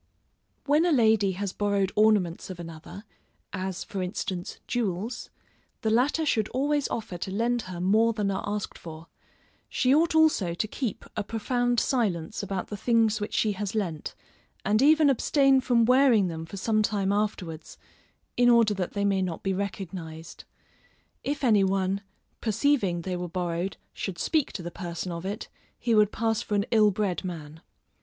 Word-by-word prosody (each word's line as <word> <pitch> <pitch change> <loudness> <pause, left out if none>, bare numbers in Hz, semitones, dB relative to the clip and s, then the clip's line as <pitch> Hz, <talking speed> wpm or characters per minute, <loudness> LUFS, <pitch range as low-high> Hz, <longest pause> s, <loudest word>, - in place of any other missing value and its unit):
When 295 +3 +4
a 350 - +2
lady 220 -7 +3
has 195 +1 -4
borrowed 200 -2 0
ornaments 210 -6 +2
of 185 -2 -7
another, 165 +4 -9 0.5
as 190 -1 -3
for 195 - -5
instance, 180 -1 -4
jewels, 225 0 -3 0.5
the 220 - 0
latter 275 +7 +2
should 220 -7 +1
always 285 +2 0
offer 195 -6 -5
to 190 - -4
lend 235 +5 0
her 180 -2 -6
more 215 +6 +3
than 210 -3 -1
are 190 - -2
asked 205 0 -4
for: 160 0 -10 0.6
she 255 0 +2
ought 320 +2 +3
also 300 - +3
to 215 - -1
keep 235 0 -4
a 215 - -1
profound 245 +3 0
silence 200 - -1
about 195 -2 -4
the 210 - -5
things 225 -1 +2
which 210 - -3
she 215 - +2
has 205 +1 -4
lent, 170 -8 -3 0.5
and 210 +3 +3
even 305 +2 +6
abstain 275 0 +3
from 240 -3 +3
wearing 250 -6 +4
them 165 -1 -6
for 200 - -8
some 215 +2 +1
time 200 -2 0
afterwards, 200 -6 -3 0.6
in 245 0 +4
order 230 -3 +5
that 185 -3 -3
they 200 0 0
may 195 -1 +2
not 180 -3 -3
be 195 - 0
recognised. 180 -4 -6 0.8
If 285 0 -3
any 215 -6 +5
one, 195 0 0 0.4
perceiving 220 -6 +1
they 185 +1 -3
were 180 0 -4
borrowed, 175 +1 -2 0.2
should 190 -4 -5
speak 310 - 0
to 180 - -5
the 175 - -5
person 175 0 -5
of 170 +2 -5
it, 205 +2 -5 0.3
he 235 - 0
would 210 -1 +4
pass 225 0 0
for 210 - -2
an 200 0 +1
ill 215 -2 +5
bred 200 -2 -1
man. 160 -3 -7
205 Hz, 170 wpm, -27 LUFS, 185-235 Hz, 0.8 s, even